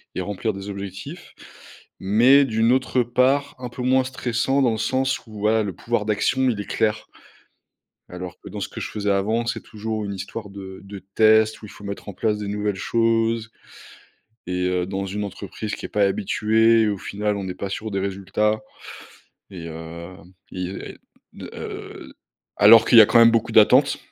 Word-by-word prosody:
et - - -2
remplir 105 +3 -3
des 100 +1 -8
objectifs, 100 - -8 0.7
mais 120 +9 +5
d'une 115 -1 +1
autre 130 0 +1
part, 130 +4 +1
un 125 -1 -6
peu 120 +1 -8
moins 130 +1 +3
stressant 130 +1 -1
dans 125 -3 +3
le 110 - -2
sens 130 +4 0
où 110 -2 -11
voilà, 110 +1 +2
le 100 -2 -4
pouvoir 115 +3 -2
d'action, 130 +5 +1
il 110 - -2
est 105 - -4
clair. 110 0 0 1.0
Alors 90 0 -8
que - - -11
dans 105 +2 -6
ce - - -3
que - - -9
je - - -5
faisais 105 -1 -2
avant, 110 +4 0
c'est 120 - -3
toujours 110 0 -5
une 100 - -4
histoire 100 +2 -7
de 95 -1 -9
de 100 0 -9 0.2
test 110 0 +4
où - - -8
il - - -12
faut 105 - -13
mettre 100 +1 -7
en - - -9
place 105 +2 -1
des 105 -1 -5
nouvelles 105 0 -2
choses 115 +2 0 1.0
et 90 0 -1
heu, 90 -1 0
dans 95 +1 -3
une 105 +2 -4
entreprise 105 +2 -6
qui - - -7
est - - -14
pas 105 - 0
habituée 110 +3 +2
et 110 - +2
au 100 -1 -2
final, 105 +2 -3
on 100 - -5
n'est 90 -1 -5
pas 100 - -5
sûr 110 +2 -5
des 100 -1 -2
résultats 100 +2 -1 0.9
et 90 -4 -9
hem, 85 +2 -10 0.2
il 90 - -6
y - - -7
a - - -8 0.4
de, - - -9
heu, - - -8 0.4
alors 110 +2 +8
qu'il 120 - +5
y - - +12
a 105 - +8
quand 115 - +4
même 115 0 +7
beaucoup 115 -1 0
d'attente - - +5
105 Hz, 200 wpm, -22 LUFS, 100-115 Hz, 1.0 s, y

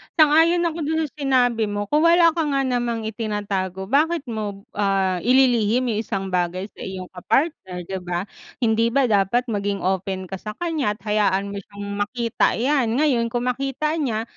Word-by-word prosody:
Sang-ayon 325 +2 +5
ako 335 -1 -1
dun 320 0 0
sa 305 - -4
sinabi 245 -5 +2
mo. 205 0 -2
Kung 300 - +4
wala 335 0 +6
ka 325 -1 -1
nga 275 -1 +1
namang 240 -3 -1
itinatago, 205 -3 -3
bakit 315 +3 +2
mo, 205 -3 -4
ah, 195 -2 +1
ililihim 245 0 +3
yung 215 - -1
isang 195 -3 -3
bagay 180 +1 -1
sa - - -21
iyong 185 -1 -6
ka-partner, 185 - -1
'di 190 +2 -5
ba? 175 0 -2 0.4
Hindi 230 0 +3
ba 275 +1 +3
dapat 215 +5 +2
maging 200 -1 -2
open 190 0 -2
ka 190 - -3
sa 215 +1 -7
kaniya 315 -11 -1
at - - -25
hayaan 200 -2 +1
mo 200 - -5
siyang 200 +1 -10
makita 230 +3 0
'yan. 260 +1 +1 0.2
Ngayon, 245 -6 +2
kung 245 +1 0
makita 275 +5 -2
niya, 225 -7 -1
225 Hz, 175 wpm, -22 LUFS, 195-275 Hz, 0.4 s, wala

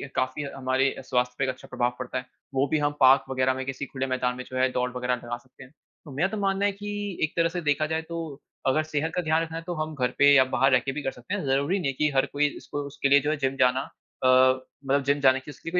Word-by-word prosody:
काफ़ी 130 +3 -1
हमारे 130 0 +1
स्वास्थ्य 125 -1 0
पे 135 - 0
एक 135 - +1
अच्छा 130 0 -7
प्रभाव 120 0 -1
पड़ता 130 0 -4
है। 125 - -4 0.3
वो 135 +1 +3
भी 155 - +1
हम 145 0 +1
पार्क 135 0 +6
वग़ैरह 130 0 +1
में 130 0 -5
किसी 135 +1 -4
खुले 135 0 -4
मैदान 125 -1 -1
में 125 - -5
जो 130 - -5
है 130 0 +3
दौड़ 125 0 0
वग़ैरह 125 0 0
लगा 120 0 -6
सकते 130 +2 -17
हैं। 130 - -16 0.3
तो 145 - -10
मेरा 175 +6 +2
तो 215 - -4
मानना 195 0 +1
है 205 - +2
कि, 205 -1 -5
एक 155 - 0
तरह 165 0 +3
से 175 - -4
देखा 150 -1 +1
जाए 160 0 -1
तो 170 - -4 0.5
अगर 155 +4 +3
सेहत 155 +1 -2
का 180 - +1
ध्यान 160 0 +1
रखना 165 0 -6
है 165 - -6
तो 175 - -2
हम 155 0 -4
घर 125 -2 0
पे 145 0 +6
या 135 -2 +7
बाहर 135 0 +4
रह 125 - +6
के 135 +2 -3
भी 150 - -4
कर 135 - -1
सकते 185 - -8
हैं। 200 -4 -2
ज़रूरी 140 +8 +1
नहीं 160 - -2
है - - -10
कि 150 +3 +1
हर 135 - +4
कोई 145 +1 +2
इसको 145 - -5
उसके 140 -1 -1
लिए 140 - +7
जो 145 - -1
है 155 - -1
जिम 135 -1 -1
जाना 125 0 +3 0.4
अ, - - +4
मतलब 130 +2 +2
जिम 140 +1 +1
जाने 130 -1 +4
की 135 - -10
उसके 155 - -8
लिए - - -9
135 Hz, 290 wpm, -26 LUFS, 130-155 Hz, 0.5 s, या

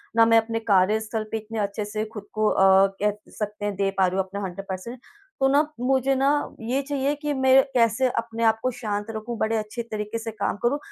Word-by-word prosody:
ना 230 0 +6
मैं 230 0 +5
अपने 225 0 0
कार्यस्थल 215 +1 +1
पे 225 - -1
इतने 220 +1 -6
अच्छे 205 +1 -2
से 215 +1 -3
खुद 210 - -7
को 215 0 +1
अ, 190 0 +5
कह 210 0 +1
सकते 210 -1 -5
हैं 205 -1 -2
दे 195 0 0
पा 190 -1 +4
रही 185 +1 -2
हूँ, 190 - +1
अपना 200 +2 -6
100% 190 +2 -6
पर्सेंट। 230 +7 -6 0.4
तो 270 - +4
ना, 285 +1 +5 0.2
मुझे 265 +1 +2
ना 270 +1 +2 0.3
ये 250 +5 -1
चाहिए 280 0 -1
कि 295 -1 -1
मैं 265 0 +5
कैसे 235 +1 +3
अपने 230 0 -2
आप 220 0 +3
को 255 - +1
शांत 210 -4 -3
रखूँ, 225 +2 -5
बड़े 220 +1 0
अच्छे 215 +3 -4
तरीके 210 +1 -3
से 225 0 -5
काम 200 -2 -2
करूँ। 245 +4 +2
220 Hz, 225 wpm, -24 LUFS, 205-240 Hz, 0.4 s, ना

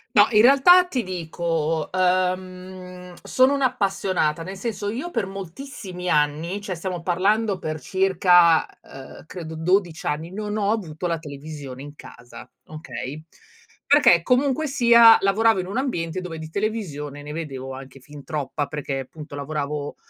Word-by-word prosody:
No, 205 - +8
in 210 -1 +5
realtà 280 +9 +7
ti 260 -9 -2
dico, 165 -3 -2
uhm, 185 0 -2
sono 260 +2 +3
un'appassionata. 195 - 0
Nel 190 +4 -7
senso 205 -1 -4
io 265 +11 -5
per 225 - -2
moltissimi 190 -1 -7
anni, 150 +6 0
cioè 200 -2 -5
stiamo 180 0 -5
parlando 195 +3 +1
per 155 -2 -4
circa, 180 -2 +3
ehm, 135 +3 -12
credo 160 -3 -8
12 175 0 0
anni, 155 +3 -3
non 210 +2 -4
ho 205 -1 +1
avuto 180 -7 -4
la 170 -2 -1
televisione 140 -3 -9
in 145 0 -10
casa, 125 -3 -13 0.2
okay? 150 -1 -8 0.6
Perché 280 - +5
comunque 270 - +1
sia 235 -4 +7
lavoravo 205 +2 +3
in - - -7
un 200 +5 -4
ambiente 185 - -2
dove 175 -3 -7
di 155 0 -8
televisione 160 -8 -4
ne 145 +1 -8
vedevo 135 -5 -6
anche 135 +1 -11
fin 145 +2 -12
troppa, 150 -2 -3
perché 145 -2 -4
appunto 150 +3 -10
lavoravo, 145 0 -4
180 Hz, 145 wpm, -23 LUFS, 155-205 Hz, 0.6 s, No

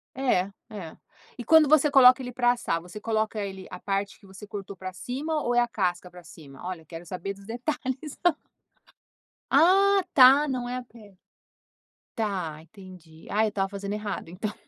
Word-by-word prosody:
É, 200 -8 +1 0.2
é. 195 -7 -8 0.4
E 240 - -6
quando 315 +3 +6
você 300 0 +5
coloca 260 -1 +7
ele 250 -1 -6
para 245 0 +2
assar, 235 -8 -2
você 180 +5 -10
coloca 220 0 -1
ele 190 -1 -7
a - - -7
parte 195 +1 -3
que 200 - -18
você 190 +2 -11
cortou 200 -2 -8
para 185 +1 -7
cima 295 - -3
ou 245 -3 -1
é 240 - +5
a 240 - +2
casca 180 -5 -2
para 180 -1 -13
cima? 140 -5 -14
Olha, 180 -3 -6
quero 165 +2 -10
saber 185 +3 -5
dos 195 0 -16
detalhes. 260 +4 -4 1.3
Ah 390 +6 +5
está, 275 0 +6
não 250 -2 -3
é 250 - -3
a 255 - -6
pele. 215 -5 -17 1.0
Está, 185 -8 -3
entendi. 175 -3 -15
Ah, 215 +2 +2
eu 220 - +2
estava 195 -2 -1
fazendo 200 0 -5
errado, 210 -5 -5
então. 205 +5 -5
210 Hz, 180 wpm, -26 LUFS, 185-255 Hz, 1.3 s, coloca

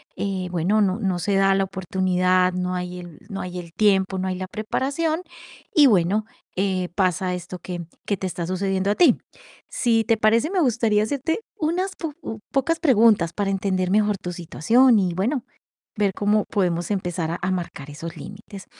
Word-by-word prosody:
eh, 190 -2 -2
bueno, 180 +5 +1
no 195 +2 +1
no 190 -4 -1
se 195 +3 0
da 195 0 +4
la 195 - +2
oportunidad, 185 0 +1
no 180 0 -2
hay 180 0 -4
el 175 -4 -11
no 195 - -4
hay 180 0 -5
el 170 -1 -10
tiempo, 195 -2 +2
no 190 - -2
hay 185 - -2
la 185 0 -5
preparación 280 - -1 0.5
y 295 -4 +8
bueno, 200 +1 +2 0.3
eh, 185 -2 0
pasa 185 -1 +1
esto 180 0 -7
que 175 -2 -6 0.2
que 200 - -1
te 190 - -5
está 170 -1 -4
sucediendo 190 +1 -1
a 210 - +1
ti. 325 -9 +5 0.5
Si 225 -2 +2
te 225 -1 +2
parece, 225 +7 +3
me 380 - +1
gustaría 225 -5 +2
hacerte 285 - -1 0.2
unas 360 +4 -1
po 320 -3 -5 0.4
pocas 320 +5 +1
preguntas 225 - +4
para 200 -1 -1
entender 185 -1 0
mejor 210 0 +2
tu 180 -1 -6
situación 225 - +3
y 180 -3 0
bueno, 235 - -1 0.5
ver 205 -2 +2
cómo 210 +1 +2
podemos 175 -3 -1
empezar 175 -4 -2
a 170 - -3
a 185 +1 0
marcar 170 -6 -4
esos 160 +3 -8
límites. 200 -1 -10
195 Hz, 180 wpm, -23 LUFS, 180-220 Hz, 0.5 s, y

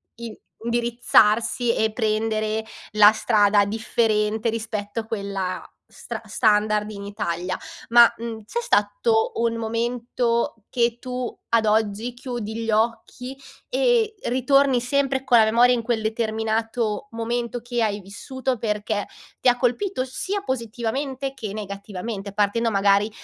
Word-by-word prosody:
in 230 -2 -8 0.2
indirizzarsi 235 0 +2
e 220 0 +1
prendere 215 -1 0 0.3
la 210 0 +8
strada 210 -2 +3
differente 220 +1 0
rispetto 220 -1 -3
a - - -13
quella 200 -4 -3 0.3
stra - - -7
standard 210 0 +2
in 200 -1 -8
Italia. 185 -3 -3 0.3
Ma, 235 0 +8
mhmm, 230 -1 -5
c'è 470 - -3
stato 475 -1 +1
un 230 0 0
momento 235 +1 -1
che 235 -1 +1
tu, 250 -1 -4 0.2
ad 230 -1 +3
oggi, 215 +2 +1
chiudi 240 -3 -5
gli - - -4
occhi 235 +4 -1 0.3
e 480 -3 +2
ritorni 260 0 +3
sempre 270 +1 0
con 240 -2 +5
la 220 - +6
memoria 240 +3 +5
in 235 - -1
quel 230 -1 0
determinato 220 +1 -1
momento 235 +1 -3
che 240 -1 -2
hai 210 -2 0
vissuto, 260 +6 -4
perché 210 -1 -2 0.3
ti - - 0
ha 245 - +6
colpito 255 - 0
sia 380 +10 -3
positivamente 260 - -3
che 220 -7 -6
negativamente? 200 0 -6
Partendo 210 +3 +1
magari 200 0 +3
230 Hz, 130 wpm, -23 LUFS, 215-245 Hz, 0.3 s, la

